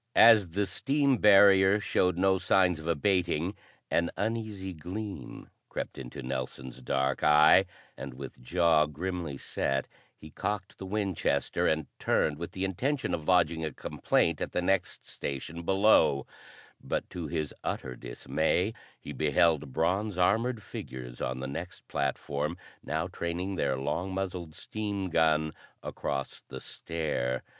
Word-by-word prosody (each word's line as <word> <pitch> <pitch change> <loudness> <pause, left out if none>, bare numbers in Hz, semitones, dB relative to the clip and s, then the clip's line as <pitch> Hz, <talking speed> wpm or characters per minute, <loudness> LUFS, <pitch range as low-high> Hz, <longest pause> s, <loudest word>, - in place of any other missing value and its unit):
As 110 -6 +7
the 100 +5 0
steam 140 - +1
barrier 100 -1 +6
showed 90 -3 +1
no 95 0 +3
signs 90 -2 +3
of 80 - -8
abating, 85 +1 +1 0.4
an 85 0 +2
uneasy 105 -4 -3
gleam 95 +5 -7 0.2
crept - - -5
into 60 -1 -7
Nelson's 65 0 -5
dark 65 +1 0
eye, 75 +5 +7 0.3
and 70 -2 -7
with 65 -1 -9
jaw 80 +2 +3
grimly 85 -1 -4
set, 70 0 -1 0.3
he 80 - -12
cocked 100 +2 -4
the 95 - -6
Winchester 95 -8 0
and 80 -1 +1
turned 75 -1 +1
with 85 - -6
the 95 +1 -2
intention 130 +10 -1
of 80 -2 -3
lodging 85 -3 +3
a 80 - -2
complaint - - 0
at - - -3
the - - +1
next 95 +1 0
station 70 +5 -5
below; 95 -7 +4 0.6
but, - - -2
to 85 -3 -5
his 75 -1 -3
utter 65 -1 -3
dismay, 80 - -1 0.3
he 75 - -8
beheld 75 +1 +2
bronze 95 +7 0
armored 110 +5 +2
figures 65 -7 -8
on 65 +1 -2
the 65 - -3
next 70 - -7
platform 70 +3 -2 0.3
now 80 +2 -1
training 90 +1 -3
their 65 -7 0
long 80 +8 -2
muzzled 90 -4 -4
steam 100 -4 -4
gun 80 -1 +2 0.3
across 70 -1 -4
the - - -7
stair. 70 -6 -3
85 Hz, 140 wpm, -29 LUFS, 75-95 Hz, 0.6 s, As